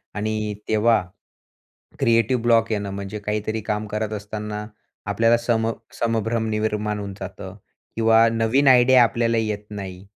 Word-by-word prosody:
आणि 105 0 -2
तेव्हा 110 0 +3 1.0
creative 115 +2 +2
block 115 -1 +3
येणं, 100 -2 -2
म्हणजे 100 +1 -6
काहीतरी 105 +1 -3
काम 105 0 -3
करत 105 +1 -3
असताना 105 0 -5 0.4
आपल्याला 115 +3 +3
सम 115 -1 0 0.3
संभ्रम 115 0 0
निर्माण 105 -1 -1
होऊन 100 -1 -6
जातं 95 0 -8 0.4
किंवा 115 0 +5
नवीन 115 +5 +2
आयडिया 125 0 +6
आपल्याला 115 0 +1
येत 105 -2 -2
नाही. 95 -2 -7
110 Hz, 130 wpm, -22 LUFS, 105-115 Hz, 1.0 s, आयडिया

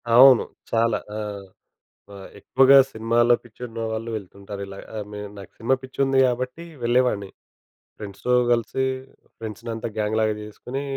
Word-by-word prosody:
అవును. 130 0 +9 0.3
చాలా. 115 0 +2 0.2
ఆ! - - -3 1.0
ఆహ్, 95 -1 -10
ఎక్కువగా 135 +1 +6
సినిమాల్లో 115 +2 +3
పిచ్చున్న 115 -1 -7
వాళ్ళు 110 +1 -4
వెళ్తుంటారు 100 0 -8
ఇలా. 95 0 -10 0.4
నేను 105 0 -6
నాకు 95 -2 -11
సినిమా 120 +4 +2
పిచ్చి 130 0 -12
ఉంది 135 0 +2
గాబట్టి 125 +6 -3 0.2
వెళ్ళేవాడిని. 120 -5 +2 0.7
ఫ్రెండ్స్‌తో 100 +4 -2 0.2
కలిసి 120 +3 0 0.5
ఫ్రెండ్స్‌నంతా 115 +1 -5
గ్యాంగ్‌లాగా 110 0 +1
జేసుకొని 125 +6 -6
115 Hz, 120 wpm, -24 LUFS, 105-125 Hz, 1.0 s, అవును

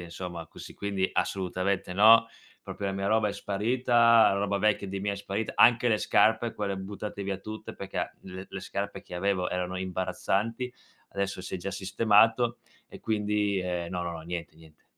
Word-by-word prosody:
insomma, 85 -1 -7
così. - - -11
Quindi, 100 -2 -1
assolutamente 95 0 -1
no. 110 +4 +7 0.3
Proprio, 100 - -5
e 95 - -1
mia 95 0 -2
roba 110 0 +3
è - - -3
sparita, 115 +3 +3
roba 100 0 0
vecchia, 105 0 +1
di 95 0 -4
mia 100 +1 -1
è - - -4
sparita, 100 +2 -3
anche 120 0 +6
le 110 -2 +2
scarpe 110 +2 +2
quelle 100 -2 -2
buttate 100 +1 -6
via 95 -1 -3
tutte, 110 +2 -8
perché - - -4
le 95 +1 -8
le - - -6
scarpe - - -5
che 90 - -8
avevo 95 -1 0
erano 90 0 -2
imbarazzanti, 95 +6 -2 0.4
adesso 100 -1 -3
si 90 - -6
è - - 0
già 95 +3 -5
sistemato. 110 +5 +3 0.3
E - - -12
quindi, 105 -2 0
ehm, 90 -2 -3
no, 90 -1 -3
no, 85 -1 -3
no 80 - -7
niente, 85 0 -6
niente. 80 -1 -19
100 Hz, 180 wpm, -28 LUFS, 90-110 Hz, 0.4 s, no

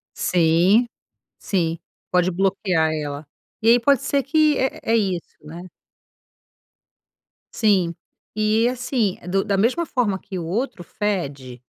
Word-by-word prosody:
Sim, 180 +7 +3 0.5
sim, 170 -4 -1 0.3
pode 180 0 +2
bloquear 185 -3 +1
ela. 145 -1 -5 0.4
E 225 - +3
aí 240 +1 +6
pode 275 +1 +3
ser 280 -2 0
que 305 +1 +2
é 265 - -1
é 225 - +1
isso, 190 -5 -2
né? 160 +3 -9 1.9
Sim. 190 -7 +2 0.4
E 215 +2 +2
assim, 250 -5 -1
do 195 +2 +1
da 200 -2 0
mesma 250 - +1
forma 225 -10 -1
que 190 -1 -8
o 170 - -4
outro 200 +1 -3
fede, 140 - -4
195 Hz, 130 wpm, -22 LUFS, 170-235 Hz, 1.9 s, aí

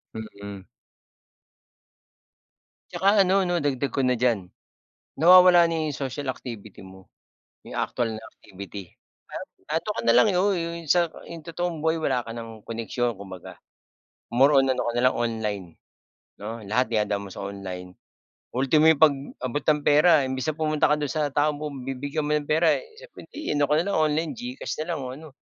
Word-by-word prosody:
Mm. 100 -3 -8 2.3
'Tsaka 200 +1 +4
ano 190 +1 +2
'no 175 - 0
dagdag 140 -1 -1
ko 135 - +1
na 125 0 +2
diyan, 110 -8 +1 0.7
nawawala 180 +2 +8
na 165 -2 -1
yung 145 - -5
social 135 0 -4
activity 110 -6 -7
mo, 95 0 -15 0.6
yung - - -9
actual 115 -2 -1
na 110 - -8
activity. 100 -2 -11 0.7
Eto 160 +7 -2
ka - - -2
na - - +5
lang 215 - +6
eh, 180 - +1
oo 200 +2 +2
yung 170 -1 -4
sa 170 +1 +3 0.2
yung 165 -1 -9
totoong 170 -1 -4
buhay 160 0 +1
wala 130 -6 0
ka 115 - -10
ng 115 -2 -8
koneksyon 115 0 -3
kumbaga. 95 -2 -10 0.7
More 135 +4 +5
on 135 -1 +4
ano - - -2
ka - - -1
na 120 - +1
lang - - -5
online, 110 -5 -2 0.7
'no? 110 +2 -7
Lahat 110 +6 +1
dinadaan 105 -3 -1
mo - - -10
sa - - -7
online, 95 -2 -7 0.6
ultimo 135 +5 +3
yung 160 -2 +5
pag-abot 140 -2 +1
ng 150 -1 +3
pera 150 +1 +5
imbes 130 +1 -3
na - - -1
pumunta 155 -1 +1
ka - - +3
do'n 145 -2 -2
sa 150 -3 -1
taong 150 0 +1
pagbibigyan 140 0 -4
mo 150 0 +1
ng 145 - -5
pera 160 +2 +3 0.2
sa - - -10
hindi 305 +1 -8
ano 145 - +3
ka 150 - 0
na - - -5
lang 200 - 0
online, 155 +1 +1
Gcash 250 +3 -5
na 175 - -3
lang 165 - -4
o 130 - -5
ano, 160 +1 -11
140 Hz, 175 wpm, -25 LUFS, 115-160 Hz, 2.3 s, nawawala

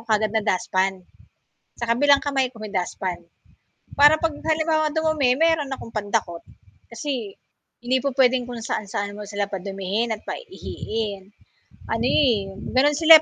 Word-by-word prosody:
kaagad 215 0 +2
na 220 - +2
dustpan, 190 +1 +1 0.9
sa - - 0
kabilang 280 +4 +4
kamay 270 -2 +2
ko 220 - -11
may 215 - -6
dustpan. 180 0 -3 0.8
Para 295 +2 +8
'pag 325 -2 +1
halimbawa 315 -1 +2
dumumi 315 -5 +2
meron 325 -4 +2
akong 230 - -8
pandakot 205 -5 -1 0.5
kasi, 235 -4 -4 0.5
hindi 255 +2 +2
po 280 - 0
puwedeng 255 -2 +3
kung 240 - -5
saan-saan 205 -2 -3
mo 210 - -8
sila 205 -1 -1
padumihin 195 +4 -2
at 210 - -17
pa-iihiin. 220 - -5 0.6
Ano 225 0 -1
eh, 240 -7 +2 0.3
gano'n 285 +3 +4
sila 320 -1 +9
235 Hz, 140 wpm, -23 LUFS, 205-290 Hz, 0.9 s, sila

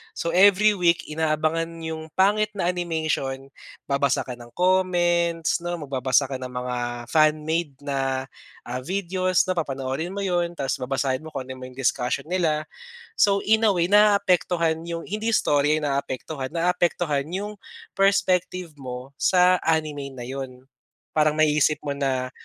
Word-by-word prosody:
so 170 - -2
every 200 +3 +6
week 175 -3 +2
inaabangan 155 +1 0 0.2
yung 160 0 -5
pangit 210 +3 +3
na 175 -3 -1
animation, 155 -6 -2 0.4
babasa 140 -1 +1
ka 125 - -5
ng 120 - -11
comments 175 -3 +2
'no, 175 -1 -3
magbabasa 135 0 +1
ka 130 - -3
ng 130 - -5
mga 125 0 -3 0.3
fan 155 -1 +3
made 160 -2 -1
na, 135 -2 -1 0.4
ah, 125 +1 -4
videos, 185 +1 +1
'na 185 - 0
papanoorin 135 +3 -3
mo 200 - -3
'yon, 175 -2 0
ta's 135 -2 -2
babasahin 130 +1 -1
mo 160 - -8
kung 135 -2 -4
ano 130 0 -8
man 130 0 -9
yung 135 - -13
discussion 125 +3 0
nila. 160 -4 +1 0.6
So, 200 -1 +4
in 220 +1 +3
a - - +5
way 175 0 +2
naaapektuhan 180 -5 +3
yung 170 -1 -4
hindi 215 +3 -3
istorya 145 -6 +3
yung 150 - -2
naapektuhan 135 0 -4
naaapektuhan 170 -4 0
yung 205 +2 -5 0.4
perspective 185 -3 +1
mo 125 +1 -7
sa 180 0 +4
anime 150 -4 -1
na 120 - -7
'yon. 130 -1 -7 0.5
Parang 155 -1 +3
naiisip 150 0 +3
mo 145 - -3
na, 130 -2 -1
160 Hz, 150 wpm, -24 LUFS, 135-180 Hz, 0.6 s, every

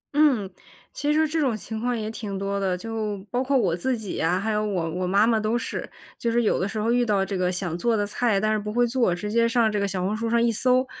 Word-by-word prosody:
嗯， 275 -10 +4 0.5
其 295 +1 -1
实 300 - +2
说 315 - +4
这 315 +1 -1
种 250 -7 +1
情 220 +2 -6
况 245 +1 -1
也 215 - -3
挺 205 -3 -5
多 200 0 -2
的， 185 -2 0
就 215 0 -3
包 250 +1 0
括 270 +1 +2
我 185 -8 +2
自 245 +8 -1
己 210 -4 -5
呀， 175 +3 +1
还 220 +3 -1
有 210 0 0
我 185 -6 -1
我 180 +2 -2
妈 200 +3 +4
妈 225 -1 +2
都 215 +2 0
是。 - - -4 0.3
就 235 - 0
是 240 +1 +2
有 215 - +2
的 190 - 0
时 215 - -5
候 220 +2 +1
遇 245 0 +3
到 205 -4 +1
这 195 +1 -4
个 180 -1 +1
想 180 -2 -3
做 230 +2 +1
的 205 - +1
菜， 210 0 +1
但 215 +2 +1
是 215 - +1
不 210 +1 -5
会 245 +2 +3
做， 235 -7 +1
直 210 +4 -5
接 230 +1 +3
上 230 -2 +3
这 210 - -1
个 200 - 0
小 185 -1 -2
红 205 +3 0
书 230 +1 -2
上 235 0 +3
一 235 0 +3
搜， 255 +3 +2
215 Hz, 310 characters per minute, -25 LUFS, 195-235 Hz, 0.5 s, 嗯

